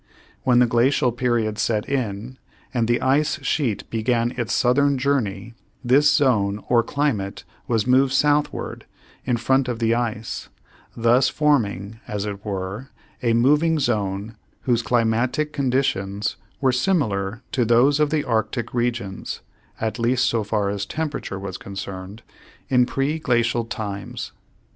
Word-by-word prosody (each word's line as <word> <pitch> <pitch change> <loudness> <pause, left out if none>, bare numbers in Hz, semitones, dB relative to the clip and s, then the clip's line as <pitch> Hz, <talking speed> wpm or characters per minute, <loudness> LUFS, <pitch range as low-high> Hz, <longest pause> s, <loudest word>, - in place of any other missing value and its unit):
When 125 -2 +3
the 125 - +6
glacial 120 +2 +2
period 120 -3 0
set 110 -2 0
in 125 -2 -3 0.3
and 120 -3 +1
the 120 0 +2
ice 140 +3 +2
sheet 120 -10 0
began 115 +1 +1
its 120 -2 -2
southern 140 +3 +3
journey 115 -6 -1 0.3
this 140 +4 +5
zone 105 -9 +2
or 120 -1 +4
climate 115 -7 -2 0.2
was 115 -3 +1
moved 130 +1 +4
southward 145 +2 0 0.4
in 125 -2 +1
front 130 +2 +2
of 120 -2 -2
the 115 0 +2
ice, 115 -2 -3 0.5
thus 120 +3 +4
forming, 110 - 0
as 105 -3 -3
it 100 -1 -5
were, 100 +4 -4 0.3
a 115 -2 +2
moving 150 +7 +3
zone 105 -3 -1 0.2
whose 120 -2 +1
climatic 120 +6 +1
conditions 105 -7 0 0.2
were 135 -2 +3
similar 120 - 0
to 125 - +1
those 120 +6 +4
of 150 -1 +3
the 150 -1 0
arctic 115 +1 -1
regions 120 -5 -2 0.4
(at 110 +2 -2
least 125 +2 +2
so 115 -2 +1
far 100 -1 0
as 100 0 -2
temperature 150 -4 -4
was 95 -1 -6
concerned) 95 +1 -7 0.5
in 125 -2 +4
preglacial 120 -5 0
times. 100 -3 -5
120 Hz, 135 wpm, -23 LUFS, 105-130 Hz, 0.5 s, the